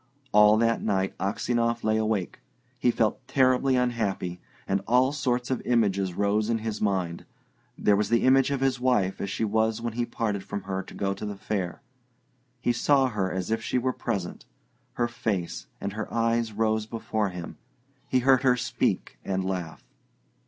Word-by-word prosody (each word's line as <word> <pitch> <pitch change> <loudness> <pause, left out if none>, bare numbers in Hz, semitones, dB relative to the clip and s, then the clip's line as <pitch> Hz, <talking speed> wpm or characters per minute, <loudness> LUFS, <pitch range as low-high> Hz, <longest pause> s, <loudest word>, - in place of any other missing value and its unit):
All 105 +1 +6
that 115 +1 +2
night 95 -2 0
Aksionov 115 +4 0
lay 110 0 +2
awake. 110 -4 -1 0.4
He 125 - +3
felt 115 -2 +1
terribly 130 0 +3
unhappy, 110 -8 -1 0.3
and 95 0 +1
all 125 +3 +4
sorts 125 -3 -1
of 130 - 0
images 100 -6 +1
rose 105 +2 +1
in 115 - +2
his 110 -1 -4
mind. 95 -5 -1 0.5
There 105 - +3
was 105 +1 0
the 115 -1 +3
image 135 +1 +5
of 140 -2 -1
his 135 -2 +1
wife 125 -7 +1
as 100 - -2
she 110 - -1
was 110 +1 +1
when 115 -1 -3
he 120 +1 -1
parted 105 -4 -2
from 100 - -5
her 95 0 -3
to - - -12
go 100 0 -1
to - - -9
the 105 -1 -4
fair. 95 -3 -3 0.8
He 120 - +2
saw 135 +2 +3
her 95 -5 -1
as 95 +3 -3
if 115 0 0
she 120 - -1
were 130 +1 0
present; 100 -7 -4 0.5
her 120 - 0
face 105 -7 -3
and 100 0 -4
her 110 +1 -5
eyes 115 0 +1
rose 110 0 0
before 110 -2 -2
him; 90 -2 -8 0.5
he - - +3
heard 130 0 +5
her 125 -2 +3
speak - - -1
and 95 -1 -1
laugh. 90 -3 -4
110 Hz, 180 wpm, -27 LUFS, 100-120 Hz, 0.8 s, All